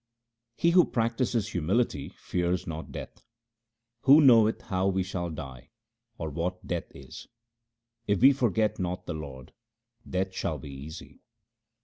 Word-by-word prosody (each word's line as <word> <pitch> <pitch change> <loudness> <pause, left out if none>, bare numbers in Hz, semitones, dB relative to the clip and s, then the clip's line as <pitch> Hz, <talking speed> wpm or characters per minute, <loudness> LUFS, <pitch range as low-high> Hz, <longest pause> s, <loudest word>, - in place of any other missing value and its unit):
He 170 - +3
who 180 0 +6
practises 115 -1 0
humility 90 - 0
fears 90 -1 -2
not 80 -1 -6
death: - - -9 0.4
— 115 +1 -57
Who 140 +3 +8
knoweth 115 -6 +6
how 95 0 -1
we 95 -1 +1
shall 90 -2 -4
die, 70 -6 -8 0.5
or 80 -2 -4
what 90 +4 -3
death 85 -1 -3
is? 65 -2 -11 0.8
If 100 -2 +2
we 135 +2 +8
forget 110 -5 +1
not 90 0 -3
the 85 - -4
Lord, 70 -4 -8 0.6
death 95 +1 -1
shall 90 -5 -2
be 70 +1 -9
easy. 70 +4 -10
95 Hz, 140 wpm, -28 LUFS, 80-115 Hz, 0.8 s, Who